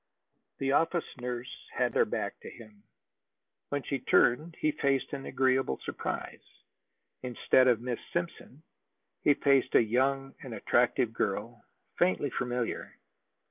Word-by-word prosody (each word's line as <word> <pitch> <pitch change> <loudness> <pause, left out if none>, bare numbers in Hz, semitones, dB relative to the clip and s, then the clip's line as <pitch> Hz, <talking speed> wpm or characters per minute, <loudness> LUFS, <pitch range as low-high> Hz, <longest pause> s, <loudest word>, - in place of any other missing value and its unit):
The 135 0 0
office 165 +4 +2
nurse 125 0 -6
had - - 0
her - - +4
back - - -3
to - - -9
him. 110 -2 -14 0.9
When 145 -1 -2
she 140 - -2
turned, 155 +7 +3
he 155 - +2
faced 140 -2 0
an 135 -1 -5
agreeable 130 - +1
surprise. - - -4 0.8
Instead 130 +1 +3
of 120 -3 +3
Miss 120 -1 -3
Simpson, 170 -4 -4 0.6
he 145 - +4
faced 135 -2 +2
a - - +9
young 135 +4 0
and 125 -4 -7
attractive 120 0 +2
girl, 110 +3 -2 0.4
faintly 95 +9 +2
familiar. 125 -1 -3
130 Hz, 130 wpm, -30 LUFS, 120-140 Hz, 0.9 s, a